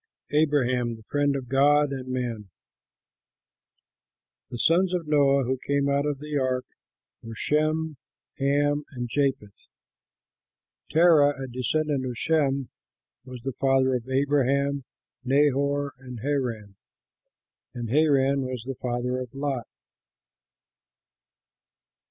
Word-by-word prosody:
ABRAHAM, 130 Hz, -6 st, +1 dB
THE 110 Hz, -, -15 dB
FRIEND 145 Hz, +4 st, 0 dB
OF 130 Hz, -2 st, -4 dB
GOD 145 Hz, +3 st, +3 dB
AND 130 Hz, -1 st, -6 dB
MAN 120 Hz, -5 st, -4 dB, 2.0 s
The 120 Hz, -, -6 dB
sons 180 Hz, +7 st, +3 dB
of 175 Hz, -2 st, -3 dB
Noah 140 Hz, -2 st, +3 dB
who 130 Hz, +1 st, -2 dB
came 140 Hz, 0 st, +1 dB
out 140 Hz, +1 st, +1 dB
of 145 Hz, -1 st, -1 dB
the 150 Hz, 0 st, -3 dB
ark 130 Hz, -1 st, -1 dB, 0.6 s
were 115 Hz, 0 st, -9 dB
Shem, 155 Hz, +3 st, 0 dB, 0.4 s
Ham 145 Hz, +1 st, +1 dB
and 120 Hz, -1 st, -4 dB
Japheth. 135 Hz, -5 st, -2 dB, 1.2 s
Terah, 155 Hz, -4 st, +5 dB
a 135 Hz, -, -4 dB
descendant 130 Hz, +2 st, -1 dB
of 125 Hz, -2 st, -5 dB
Shem, 140 Hz, -4 st, +1 dB, 0.6 s
was 125 Hz, -2 st, -10 dB
the 135 Hz, -1 st, -3 dB
father 135 Hz, -1 st, +3 dB
of 125 Hz, 0 st, -3 dB
Abraham, 140 Hz, 0 st, +1 dB, 0.4 s
Nahor 140 Hz, +1 st, +1 dB
and 125 Hz, -3 st, -9 dB
Haran; 115 Hz, -8 st, -3 dB, 1.0 s
and 120 Hz, -2 st, -5 dB
Haran 140 Hz, -2 st, +3 dB
was 130 Hz, -3 st, -4 dB
the 130 Hz, 0 st, -6 dB
father 125 Hz, +1 st, -2 dB
of 125 Hz, 0 st, -8 dB
Lot. 135 Hz, -5 st, -3 dB
135 Hz, 115 wpm, -26 LUFS, 125-145 Hz, 2.0 s, Terah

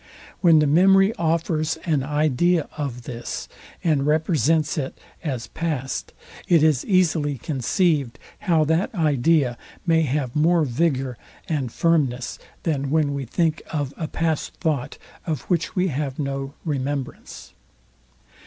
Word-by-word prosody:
When 170 Hz, -3 st, +6 dB
the 150 Hz, -, +4 dB
memory 195 Hz, +7 st, +5 dB
offers 160 Hz, -2 st, 0 dB
an 155 Hz, -5 st, +1 dB
idea 150 Hz, +4 st, +1 dB
of 135 Hz, -5 st, -4 dB
this, 120 Hz, 0 st, -6 dB, 0.4 s
and 150 Hz, -4 st, +2 dB
represents 155 Hz, -, +2 dB
it 135 Hz, -4 st, -3 dB, 0.3 s
as 130 Hz, -7 st, -3 dB
past, 135 Hz, 0 st, -3 dB, 0.4 s
it 165 Hz, -3 st, +5 dB
is 155 Hz, -5 st, +3 dB
easily 160 Hz, -7 st, +2 dB
conceived 140 Hz, -, 0 dB, 0.3 s
how 160 Hz, -2 st, +5 dB
that 160 Hz, +7 st, 0 dB
idea 150 Hz, -5 st, +2 dB, 0.3 s
may 165 Hz, -2 st, +4 dB
have 135 Hz, -4 st, -1 dB
more 165 Hz, +2 st, +4 dB
vigour 135 Hz, -2 st, 0 dB, 0.3 s
and 140 Hz, -7 st, -1 dB
firmness, 135 Hz, -7 st, 0 dB, 0.2 s
than 140 Hz, -4 st, -1 dB
when 150 Hz, -1 st, +2 dB
we 140 Hz, -1 st, -3 dB
think 160 Hz, +5 st, 0 dB
of 145 Hz, -3 st, -2 dB
a 160 Hz, -, -4 dB
past 160 Hz, -1 st, -2 dB
thought, 150 Hz, -7 st, -2 dB, 0.3 s
of 155 Hz, -6 st, -1 dB
which 170 Hz, -2 st, -1 dB
we 185 Hz, 0 st, +2 dB
have 140 Hz, -2 st, -3 dB
no 140 Hz, -1 st, -3 dB
remembrance. 140 Hz, -3 st, -4 dB
150 Hz, 130 wpm, -23 LUFS, 135-165 Hz, 0.4 s, When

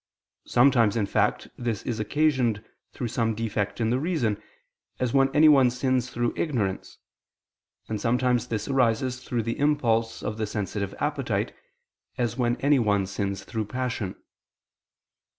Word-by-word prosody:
Sometimes, 120 Hz, -4 st, +4 dB
in 105 Hz, -, +1 dB
fact, -, -, 0 dB
this 115 Hz, -4 st, -2 dB
is 115 Hz, -2 st, -3 dB
occasioned 120 Hz, -2 st, +1 dB, 0.3 s
through 120 Hz, -, -4 dB
some 115 Hz, -2 st, 0 dB
defect 105 Hz, -2 st, -2 dB
in 115 Hz, -1 st, +1 dB
the 125 Hz, -, +1 dB
reason, 135 Hz, -, -1 dB, 0.6 s
as 125 Hz, -2 st, -1 dB
when 135 Hz, -1 st, +4 dB
anyone 145 Hz, -3 st, +6 dB
sins 125 Hz, 0 st, 0 dB
through 120 Hz, -1 st, -1 dB
ignorance; 110 Hz, -, -2 dB, 0.9 s
and 110 Hz, -2 st, -3 dB
sometimes 125 Hz, +1 st, +1 dB
this 110 Hz, -2 st, -3 dB
arises 130 Hz, -1 st, +1 dB
through 120 Hz, -3 st, -2 dB
the 115 Hz, +1 st, -3 dB
impulse 115 Hz, -6 st, +1 dB
of 105 Hz, 0 st, -3 dB
the 110 Hz, -, -1 dB
sensitive 100 Hz, -1 st, -3 dB
appetite, 135 Hz, -9 st, -1 dB, 0.6 s
as 120 Hz, -2 st, -1 dB
when 120 Hz, -1 st, +1 dB
anyone 115 Hz, -9 st, +3 dB
sins 100 Hz, 0 st, -3 dB
through 110 Hz, +2 st, -3 dB
passion. 115 Hz, -4 st, -3 dB
120 Hz, 135 wpm, -26 LUFS, 110-130 Hz, 0.9 s, anyone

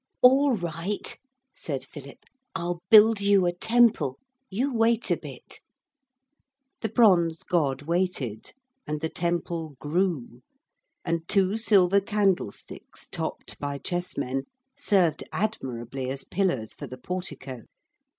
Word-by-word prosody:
'All 265 Hz, 0 st, +6 dB
right,' 175 Hz, +3 st, -4 dB, 0.4 s
said 140 Hz, -4 st, -5 dB
Philip. 140 Hz, -2 st, -12 dB, 0.3 s
'I'll 175 Hz, -1 st, -2 dB
build 220 Hz, 0 st, +7 dB
you 200 Hz, -2 st, +4 dB
a 175 Hz, -, +1 dB
temple. 220 Hz, -, +3 dB, 0.3 s
You 250 Hz, +8 st, -1 dB
wait 230 Hz, 0 st, +2 dB
a -, -, +5 dB
bit.' -, -, -11 dB, 1.2 s
The 220 Hz, -, -1 dB
bronze 175 Hz, -8 st, +4 dB
god 145 Hz, -6 st, 0 dB
waited 165 Hz, -, -2 dB, 0.3 s
and 150 Hz, 0 st, -2 dB
the 160 Hz, -, -2 dB
temple 170 Hz, -3 st, -2 dB
grew, 150 Hz, -6 st, -1 dB, 0.6 s
and 165 Hz, -1 st, -2 dB
two 195 Hz, 0 st, +2 dB
silver 200 Hz, -4 st, +4 dB
candlesticks, 195 Hz, -, -2 dB
topped -, -, -5 dB
by 145 Hz, -1 st, -3 dB
chessmen, 140 Hz, -6 st, -3 dB, 0.3 s
served 180 Hz, -7 st, +2 dB
admirably 130 Hz, -, -3 dB
as 135 Hz, +1 st, -2 dB
pillars 175 Hz, -, -1 dB
for 145 Hz, -, -8 dB
the 130 Hz, +1 st, -9 dB
portico. 135 Hz, -6 st, -6 dB
175 Hz, 115 wpm, -26 LUFS, 140-200 Hz, 1.2 s, build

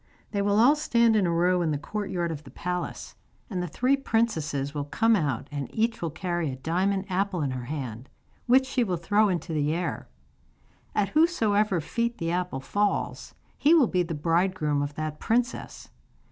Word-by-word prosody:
They 200 Hz, -, 0 dB
will 200 Hz, 0 st, +2 dB
all 260 Hz, +6 st, +6 dB
stand 235 Hz, -6 st, +3 dB
in 200 Hz, -4 st, +3 dB
a -, -, +1 dB
row 175 Hz, +2 st, +2 dB
in 165 Hz, -, +1 dB
the 150 Hz, -, 0 dB
courtyard 175 Hz, 0 st, -3 dB
of 155 Hz, -1 st, -6 dB
the 135 Hz, -, -12 dB
palace, 180 Hz, +6 st, -4 dB, 0.4 s
and 185 Hz, -2 st, -2 dB
the 180 Hz, -, -2 dB
three 255 Hz, -, +2 dB
princesses 160 Hz, -, -1 dB
will 145 Hz, -2 st, -3 dB
come 225 Hz, +9 st, +3 dB
out, 145 Hz, -, -1 dB
and 140 Hz, -3 st, -4 dB
each 225 Hz, +1 st, 0 dB
will 165 Hz, -, -1 dB
carry 175 Hz, -1 st, -2 dB
a 130 Hz, -, -4 dB
diamond 185 Hz, +8 st, 0 dB
apple 190 Hz, -3 st, -1 dB
in 135 Hz, -, -1 dB
her 125 Hz, -1 st, -5 dB
hand, 125 Hz, -3 st, -6 dB, 0.4 s
which 260 Hz, +2 st, +5 dB
she 260 Hz, -1 st, 0 dB
will 185 Hz, -5 st, -1 dB
throw 205 Hz, +5 st, +2 dB
into 175 Hz, -2 st, -2 dB
the 150 Hz, +1 st, +1 dB
air. 175 Hz, 0 st, -3 dB, 0.9 s
At 200 Hz, -2 st, +1 dB
whosesoever 215 Hz, -, +2 dB
feet 235 Hz, +9 st, -2 dB
the 165 Hz, 0 st, -2 dB
apple 180 Hz, -6 st, -2 dB
falls 205 Hz, +8 st, -1 dB, 0.2 s
he 310 Hz, +4 st, +5 dB
will 305 Hz, -6 st, +6 dB
be 180 Hz, -3 st, +1 dB
the 165 Hz, -2 st, -3 dB
bridegroom 165 Hz, -2 st, +1 dB
of 145 Hz, 0 st, -3 dB
that 155 Hz, -1 st, -4 dB
princess. 240 Hz, +2 st, -2 dB
180 Hz, 190 wpm, -27 LUFS, 155-215 Hz, 0.9 s, all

